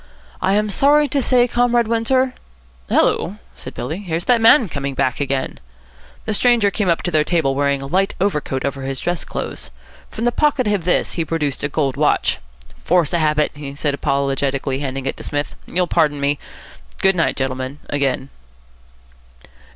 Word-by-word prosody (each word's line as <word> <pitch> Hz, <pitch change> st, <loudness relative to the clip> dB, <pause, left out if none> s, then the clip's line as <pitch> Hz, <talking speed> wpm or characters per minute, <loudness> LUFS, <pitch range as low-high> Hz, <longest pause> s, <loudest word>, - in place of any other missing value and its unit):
"I 190 Hz, +1 st, +2 dB
am 210 Hz, 0 st, +1 dB
sorry 290 Hz, +6 st, +4 dB
to 280 Hz, +1 st, +1 dB
say, 250 Hz, -1 st, +3 dB
Comrade 240 Hz, -1 st, +2 dB
Windsor 255 Hz, +3 st, +1 dB, 0.3 s
" 60 Hz, 0 st, -30 dB
"Hullo," 195 Hz, +4 st, +1 dB, 0.2 s
said -, -, -9 dB
Billy, 160 Hz, +5 st, -4 dB
"here's 175 Hz, -3 st, -3 dB
that 245 Hz, -2 st, +3 dB
man 230 Hz, +1 st, +6 dB
coming 140 Hz, -4 st, -4 dB
back 130 Hz, -2 st, 0 dB
again." 135 Hz, -2 st, -2 dB, 0.7 s
The 215 Hz, -, -1 dB
stranger 230 Hz, -2 st, +3 dB
came 195 Hz, -2 st, 0 dB
up 170 Hz, -, +1 dB
to 175 Hz, -, -1 dB
their 155 Hz, -2 st, +3 dB
table, 155 Hz, -4 st, +1 dB
wearing 140 Hz, 0 st, 0 dB
a -, -, -5 dB
light 190 Hz, +7 st, 0 dB
overcoat 150 Hz, -8 st, -1 dB
over 140 Hz, -1 st, -3 dB
his 135 Hz, 0 st, -3 dB
dress 175 Hz, -2 st, -2 dB
clothes. -, -, -5 dB, 0.4 s
From 225 Hz, -, -4 dB
the 240 Hz, -, +3 dB
pocket 285 Hz, -2 st, +1 dB
of 205 Hz, -5 st, 0 dB
this 180 Hz, -, +1 dB
he 170 Hz, -, -1 dB
produced 150 Hz, -4 st, -2 dB
a 140 Hz, -, 0 dB
gold 140 Hz, -3 st, -1 dB
watch. -, -, +2 dB, 0.4 s
"Force 175 Hz, -3 st, +2 dB
of 170 Hz, -, +2 dB
habit," 150 Hz, -1 st, +2 dB
he 145 Hz, -2 st, -8 dB
said 145 Hz, -1 st, -1 dB
apologetically, 140 Hz, -1 st, -1 dB
handing 135 Hz, -1 st, -4 dB
it 135 Hz, -, -2 dB
to -, -, -9 dB
Psmith. 145 Hz, 0 st, -3 dB
"You'll 180 Hz, 0 st, 0 dB
pardon 155 Hz, -4 st, +1 dB
me. 140 Hz, +1 st, 0 dB, 0.6 s
Good 190 Hz, 0 st, +5 dB
night, 165 Hz, -, +1 dB
gentlemen, 130 Hz, +1 st, -3 dB
again." 140 Hz, -1 st, -1 dB
155 Hz, 180 wpm, -19 LUFS, 140-205 Hz, 0.7 s, man